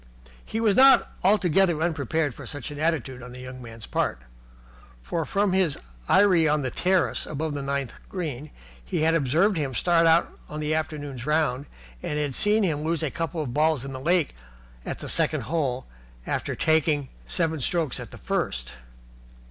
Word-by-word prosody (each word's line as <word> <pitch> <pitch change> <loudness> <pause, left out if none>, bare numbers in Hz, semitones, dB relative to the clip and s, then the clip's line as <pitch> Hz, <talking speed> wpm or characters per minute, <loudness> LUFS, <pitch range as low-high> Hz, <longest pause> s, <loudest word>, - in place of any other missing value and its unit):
He 225 - -4
was 215 -3 +3
not 265 +1 +7
altogether 190 -4 +3
unprepared 160 -3 0
for - - -10
such 145 -1 -6
an 145 - -7
attitude 145 -6 -1
on 125 0 -9
the 125 - -9
young 130 0 -8
man's 115 -2 -9
part: 60 - -1 0.8
for 110 - -3
from 200 +2 +1
his 185 -6 +2 0.3
eyrie 185 -5 +5
on 150 -1 +2
the 130 - -2
terrace 185 +3 +1
above 155 +1 -3
the 145 - -3
ninth 140 -2 -2 0.2
green 155 -6 -4 0.3
he - - -2
had 160 +1 +3
observed 165 +7 +2
him 140 -5 -2
start 170 +2 +3
out 165 +1 +3
on 150 - -5
the 155 0 -1
afternoon's 145 -5 -3
round 150 -3 +1 0.3
and 150 - -3
had 145 -2 -1
seen 210 - +2
him 155 -5 0
lose 165 0 0
a 150 - -1
couple 165 -1 -3
of 125 -5 -5
balls 155 -2 +2
in 135 - -6
the 130 - -6
lake 170 0 +2 0.5
at - - -3
the - - -7
second - - +1
hole 135 -5 -1 0.4
after - - -2
taking 155 -3 +2 0.2
seven 160 -3 0
strokes 155 +1 0
at - - -7
the - - -11
first. - - -2
155 Hz, 180 wpm, -26 LUFS, 135-170 Hz, 0.8 s, not